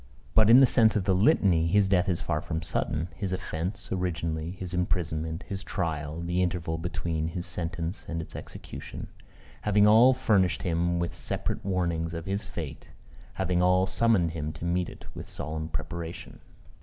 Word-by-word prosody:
But, 110 -1 +5
in 125 +3 +9
the - - +9
sense 115 -3 +4
of 105 - +1
the 95 0 +2
Litany, 95 - +4
his 100 +3 +4
death 95 0 +2
is 85 - 0
far 75 -2 -1
from 80 -1 -4
sudden; 80 0 -1
his 95 -2 -3
offence, 95 +2 -4
originally, 85 -3 -2
his 90 -1 -6
imprisonment, 80 -2 -1
his 100 -1 -4
trial, 80 -4 -3
the 85 +1 0
interval 85 -3 -1
between 80 -2 -2
his 85 +2 -4
sentence 85 +1 -4
and 85 - -2
its 80 - -7
execution, - - -8 0.5
having 105 0 +4
all 115 +5 +7
furnished 100 -8 +2
him 85 0 +1
with 85 0 -2
separate - - -3
warnings 85 -3 -1
of 85 0 -5
his 100 +2 -2
fate 85 -6 -7 0.5
having 90 -2 0
all 90 +1 +4
summoned 100 -6 +2
him 75 -2 -3
to 80 +2 -7
meet 90 0 0
it - - -13
with - - -8
solemn 80 +2 -4
preparation. 80 +2 -6
85 Hz, 170 wpm, -28 LUFS, 80-95 Hz, 0.5 s, in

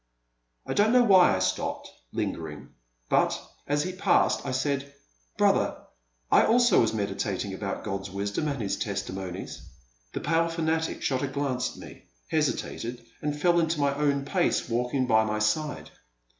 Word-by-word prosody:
I - - -2
don't 210 +3 +3
know 250 -1 +6
why 190 - +6
I - - 0
stopped, 95 0 -1 0.2
lingering, 75 -3 -4 0.4
but, - - +2 0.3
as 145 0 +1
he 185 - -3
passed, 185 - +2
I - - -1
said, 140 +1 -1 0.5
Brother, - - +2 0.5
I - - +7
also 240 +2 +5
was 115 - +2
meditating 100 -2 -2
upon 100 +1 -4
God*s 100 -2 -4
wisdom 100 +9 -2
and 140 -2 -2
His 100 - -1
testimonies.*' 95 -3 -5 0.5
The - - -3
pale 165 +2 +1
fanatic 160 -1 -1
shot 130 -2 0
a 140 - 0
glance 135 -2 -2
at - - -15
me, - - -14 0.3
hesitated, 120 0 -2 0.2
and 150 0 -2
fell 170 +2 +4
into 160 -1 0
my 140 -1 +2
own 140 -1 0
pace, - - +1
walking 125 +2 0
by 110 -2 +4
my 110 0 -1
side. 125 +8 -1
135 Hz, 155 wpm, -27 LUFS, 100-155 Hz, 0.5 s, I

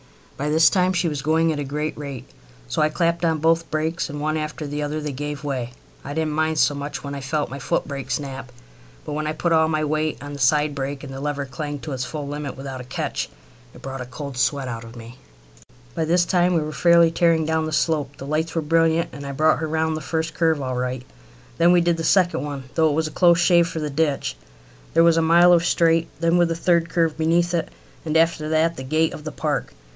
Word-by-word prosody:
By 145 +2 -2
this 160 +2 +5
time 185 -1 +2
she 175 -1 +1
was 150 -3 -2
going 160 +2 +2
at 145 - -4
a - - -1
great 150 +3 -3
rate, 140 -4 -7 0.4
so - - -1
I 155 - +3
clapped 170 +1 0
on 165 -1 +2
both 165 +2 +1
brakes, 160 +2 -2
and 145 0 -6
one 155 +1 -1
after 155 0 -4
the 145 +1 -4
other 150 +1 -2
they 150 -1 -4
gave 145 +2 -5
way. 130 -4 -3 0.3
I 145 +1 -6
didn't 160 -1 0
mind 160 0 0
so 150 - +3
much 145 +1 -5
when 140 0 -5
I 140 - -5
felt 145 +2 -2
my 140 - -6
footbrake 135 0 -3
snap, 135 -1 -4 0.5
but - - -5
when 155 +1 -2
I 155 - -1
put 170 +2 -1
all 160 0 +4
my 155 -1 0
weight 155 +1 -1
on 145 - -7
my 145 - -6
side 150 +2 +2
brake, 140 0 -4
and 135 -2 -8
the 135 - -7
lever 145 -1 -2
clanged 145 +2 -6
to 155 - -5
its 130 -1 -3
full 145 +1 -5
limit 145 -1 -5
without 135 -1 -6
a - - -8
catch, 125 - -3 0.5
it - - -14
brought 135 -1 -5
a 125 - -6
cold 140 +1 -7
sweat 135 +1 0
out 115 -2 -5
of 115 +1 -12
me. 120 +1 -11 0.7
By 160 - -1
this 175 +2 +3
time 180 0 +2
we 165 - +2
were 155 0 -4
fairly 170 +2 +5
tearing 165 -1 +2
down 160 0 0
the - - -4
slope. 150 -3 0
The 135 - -8
lights 155 +3 -2
were 165 - 0
brilliant, 165 +1 +2
and 140 - -8
I 140 - -4
brought 155 +3 +3
her 160 - -2
round 160 0 0
the 155 - -5
first 160 +2 -2
curve 160 -3 +1
all 130 -2 -3
right. 125 0 -3 0.6
Then 170 +1 +5
we 175 -1 +5
did 170 -1 +1
the 165 - -3
second 175 0 +2
one, 145 -2 -5
though 160 -1 +3
it - - 0
was 160 +1 +1
a - - -7
close 170 +1 +4
shave 170 -1 +4
for 165 - -5
the 150 -1 -3
ditch. 145 -1 0 0.6
There 165 - +6
was 170 -1 +5
a - - +4
mile 170 +2 +6
of 170 -1 +4
straight 165 -1 +2
then 170 +1 +2
with 175 - +4
the 165 - -2
third 170 0 +2
curve 165 -2 +1
beneath 170 +2 +1
it, 165 -2 -1 0.3
and 155 0 0
after 160 -1 +2
that 160 +1 +2
the 130 - -6
gate 155 +4 +1
of 150 - -8
the 155 - -5
park. - - -3
155 Hz, 250 wpm, -22 LUFS, 140-165 Hz, 0.7 s, There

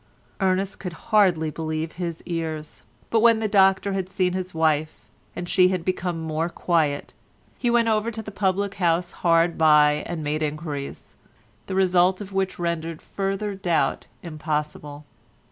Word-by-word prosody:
Ernest 190 +1 0
could 180 -3 -5 0.2
hardly 175 -7 +4
believe 160 0 -3
his 170 -2 -5
ears, 160 -3 -5 0.3
but 225 - +4
when 230 0 +5
the 220 -1 -1
doctor 195 -1 +3
had 190 -1 -2
seen 185 -1 0
his 185 0 -3
wife 155 -1 0 0.3
and 175 - -5
she 180 0 +5
had 185 -2 -2
become 180 -2 -1
more 160 +1 -2
quiet, 160 -5 0 0.5
he 245 - +1
went 235 -1 +3
over 220 0 +1
to 220 -1 -6
the 210 - -8
public 195 0 0
house 175 0 +2
hard 170 -1 +2
by 150 -1 +5
and 170 -3 -4
made 150 +1 -1
enquiries, 150 -2 -5 0.5
the 190 - -3
result 185 -1 +3
of 200 -2 -8
which 190 -1 -1
rendered 165 -2 -3
further 195 +1 -3
doubt 180 -4 0 0.2
impossible. 150 -2 -4
175 Hz, 155 wpm, -24 LUFS, 160-195 Hz, 0.5 s, when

